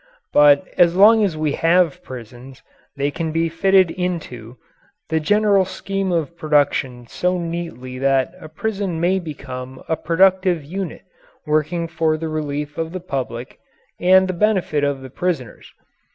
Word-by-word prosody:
But 145 +4 +5
as 175 -1 +5
long 215 +3 +6
as 180 -6 -1
we 155 -1 0
have 165 0 +2
prisons 125 +1 -11 0.3
they 140 0 -1
can 160 +2 -3
be 165 +1 0
fitted 190 +1 +3
into 130 -10 -5 0.5
the 160 0 +1
general 205 +4 +3
scheme 190 +1 -3
of 170 -1 -1
production 145 -6 0
so 180 +9 -1
neatly 165 -7 -5
that 135 +3 +1
a 155 - -11
prison 195 0 -3
may 180 +3 +2
become 130 -5 -8
a 160 - +1
productive 185 +1 +2
unit 185 +4 -5 0.4
working 155 +2 0
for 160 -1 0
the 160 0 -4
relief 150 -1 -4
of 165 +1 -3
the 185 - -4
public 130 -7 -5 0.4
and 190 +1 +5
the 185 - -2
benefit 180 -6 +1
of 140 -1 -1
the 130 -1 -10
prisoners. 160 - -4
165 Hz, 150 wpm, -20 LUFS, 140-180 Hz, 0.5 s, long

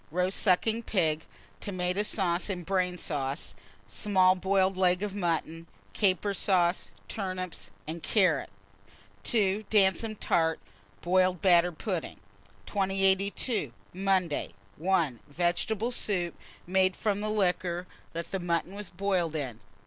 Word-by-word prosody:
Roast 180 +4 +1
sucking 220 +4 +3
pig, 160 -8 0 0.3
tomata 185 0 -1
sauce 185 -3 0
and 180 -3 -3
brain 180 -1 0
sauce; 140 - -3 0.3
small 185 - +3
boiled 190 +1 +1
leg 180 0 +2
of 205 -2 -3
mutton, 165 -3 -2 0.3
caper 200 0 +2
sauce, 180 -2 +2 0.2
turnips, 185 -3 -4 0.2
and 165 +2 -5
carrots. 180 - +2 0.7
2. 205 - +1
Damson 215 +2 +3
tart, 160 -5 +1 0.4
boiled 185 0 +2
batter 175 -2 +5
pudding. 180 +1 -4 0.5
2082. 195 - 0 0.2
Monday. 185 -4 0 0.2
1. 165 -8 +1
Vegetable 180 - 0
soup, 180 -8 0 0.3
made 185 +1 +2
from 205 -2 -1
liquor 185 -4 0 0.3
that 170 +3 -4
mutton 170 +1 -1
was 205 -1 -5
boiled 180 -3 -1
in. 130 -7 -4
185 Hz, 110 wpm, -29 LUFS, 170-195 Hz, 0.7 s, batter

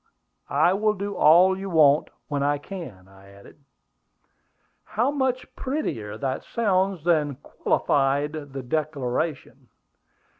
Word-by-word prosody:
I 180 - +3
will 210 +2 +1
do 200 +1 -4
all 180 +3 +5
you 195 +1 -6
want 150 -4 +4 0.2
when 145 -2 -2
I 145 +1 +1
can," 140 - -9
I 95 0 -18
added. 100 +9 -17 1.2
"How 240 +6 0
much 265 -3 -2
prettier 115 - -3
that 130 +1 -3
sounds 195 -6 0
than 155 -5 +1
'qualified 140 +1 0
the 145 -4 -7
declaration.'" 145 +1 -3
155 Hz, 115 wpm, -24 LUFS, 135-195 Hz, 1.2 s, all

